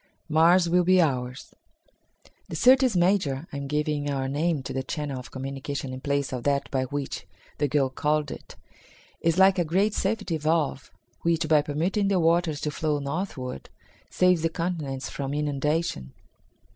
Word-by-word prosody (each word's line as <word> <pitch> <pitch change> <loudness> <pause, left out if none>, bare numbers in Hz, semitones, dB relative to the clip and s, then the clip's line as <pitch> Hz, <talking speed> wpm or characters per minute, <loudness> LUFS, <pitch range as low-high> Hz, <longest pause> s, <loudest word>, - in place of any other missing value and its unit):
Mars 170 +3 +4
Will 180 +1 +3
Be 185 +1 +4
Ours. 130 -4 -1 1.0
"The - - -5
Syrtis 255 -3 +5
Major 175 -6 +2
(I - - -3
am 140 0 -5
giving 150 0 -1
our 135 -1 -1
name 150 +1 0
to - - -5
the 130 - -1
channel 145 -1 -4
of 125 - -10
communication 135 0 -5
in 130 - -7
place 140 -1 -1
of 125 - -3
that 140 +2 0
by 130 -1 0
which 140 +1 -5 0.3
the 145 - +2
girl 140 -2 +1
called 150 +1 0
it) - - -10 0.6
is 165 0 +1
like 190 0 +5
a - - +3
great 190 +6 +1
safety 195 -5 -1
valve, 155 -3 0 0.3
which, 170 -1 +1
by 155 -1 +5
permitting 170 +8 0
the 195 -2 +2
waters 165 -2 +2
to 150 - -1
flow 150 0 -1
northward, 140 - -4 0.4
saves 180 -2 +3
the 165 - +1
continents 160 -6 -3
from 140 0 -4
inundation." 150 - -1
150 Hz, 165 wpm, -26 LUFS, 140-170 Hz, 1.0 s, Syrtis